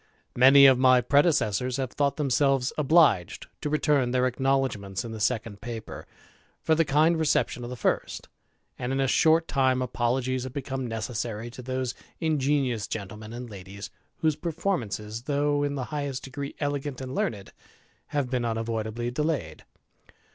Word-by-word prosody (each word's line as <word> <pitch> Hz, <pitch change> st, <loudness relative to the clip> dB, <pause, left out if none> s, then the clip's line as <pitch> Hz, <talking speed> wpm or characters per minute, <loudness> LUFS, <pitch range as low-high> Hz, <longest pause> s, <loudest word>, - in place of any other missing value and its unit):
Many 135 Hz, +3 st, +8 dB
of 130 Hz, -2 st, +7 dB
my 130 Hz, -1 st, +6 dB
predecessors 130 Hz, -, +2 dB
have 130 Hz, -2 st, -3 dB
thought 140 Hz, -1 st, 0 dB
them 145 Hz, -3 st, -1 dB
selves 135 Hz, -1 st, +2 dB
obliged 150 Hz, -, +3 dB, 0.2 s
to 150 Hz, -, -2 dB
return 145 Hz, -4 st, +2 dB
their 125 Hz, 0 st, +2 dB
acknowledgments 130 Hz, -6 st, -1 dB
in 115 Hz, -, -6 dB
the 110 Hz, -, -6 dB
second 110 Hz, -2 st, -1 dB
paper, 115 Hz, -1 st, -7 dB, 0.5 s
for 160 Hz, -, +1 dB
the 165 Hz, +1 st, +3 dB
kind 155 Hz, +3 st, +3 dB
reception 145 Hz, -5 st, +1 dB
of 120 Hz, -, -6 dB
the 125 Hz, -, -5 dB
first; -, -, -2 dB, 0.5 s
and, 125 Hz, +1 st, -3 dB
in 135 Hz, -, 0 dB
a 135 Hz, -, +2 dB
short 160 Hz, +4 st, +3 dB
time, 130 Hz, -2 st, +2 dB
apologies 125 Hz, +1 st, -1 dB
have 130 Hz, -1 st, -7 dB
become 135 Hz, -2 st, -4 dB
necessary 115 Hz, 0 st, -4 dB
to 125 Hz, -, -9 dB
those 130 Hz, 0 st, -3 dB, 0.3 s
ingenious 140 Hz, -8 st, 0 dB
gentlemen 105 Hz, +1 st, -6 dB
and 120 Hz, +1 st, -7 dB
ladies, 100 Hz, +1 st, -9 dB, 0.3 s
whose 155 Hz, -2 st, +2 dB
performances^ 120 Hz, -, -3 dB
though 145 Hz, 0 st, +1 dB
in 145 Hz, 0 st, -1 dB
the 135 Hz, -, -3 dB
highest 140 Hz, -3 st, -3 dB
degree 140 Hz, +1 st, -6 dB
el^ant 145 Hz, -2 st, -3 dB
and 130 Hz, -1 st, -6 dB
learned, 100 Hz, -7 st, -3 dB, 0.5 s
have 145 Hz, -3 st, -1 dB
been 125 Hz, -1 st, -1 dB
.r^j 120 Hz, -, -1 dB
unavoidably 115 Hz, +1 st, -3 dB
delayed. 140 Hz, -, -2 dB
130 Hz, 160 wpm, -26 LUFS, 115-145 Hz, 0.5 s, Many